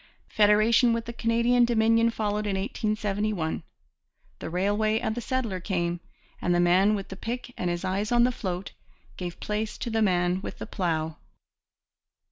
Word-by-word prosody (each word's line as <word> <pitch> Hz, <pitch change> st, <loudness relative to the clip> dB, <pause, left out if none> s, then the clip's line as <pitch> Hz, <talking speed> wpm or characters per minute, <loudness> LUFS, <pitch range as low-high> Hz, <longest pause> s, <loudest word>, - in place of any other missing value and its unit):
Federation 215 Hz, +3 st, +4 dB
with 230 Hz, 0 st, -2 dB
the 235 Hz, -, -6 dB
Canadian 235 Hz, +1 st, +2 dB
Dominion 230 Hz, 0 st, +3 dB
followed 210 Hz, -2 st, -2 dB
in 195 Hz, -, 0 dB
1871; 205 Hz, -3 st, -1 dB, 0.8 s
the -, -, -5 dB
railway 205 Hz, +5 st, +1 dB
and 220 Hz, -, -1 dB
the 240 Hz, -, -4 dB
settler 235 Hz, -6 st, -2 dB
came; 175 Hz, -2 st, -1 dB, 0.4 s
and 175 Hz, -, +1 dB
the -, -, +2 dB
man 185 Hz, +4 st, +4 dB
with 195 Hz, -2 st, -5 dB
the 190 Hz, -, -6 dB
pick 245 Hz, +5 st, -5 dB
and 180 Hz, -, -2 dB
his 175 Hz, +2 st, -2 dB
eyes 195 Hz, +4 st, -1 dB
on 240 Hz, 0 st, +5 dB
the 250 Hz, -, +3 dB
'float' 185 Hz, -5 st, -4 dB, 0.4 s
gave 175 Hz, -2 st, -6 dB
place 210 Hz, +1 st, -3 dB
to 240 Hz, -, -4 dB
the 225 Hz, 0 st, +1 dB
man 180 Hz, -2 st, +2 dB
with -, -, -7 dB
the -, -, -6 dB
plough. 160 Hz, -4 st, -2 dB
210 Hz, 165 wpm, -27 LUFS, 185-230 Hz, 0.8 s, on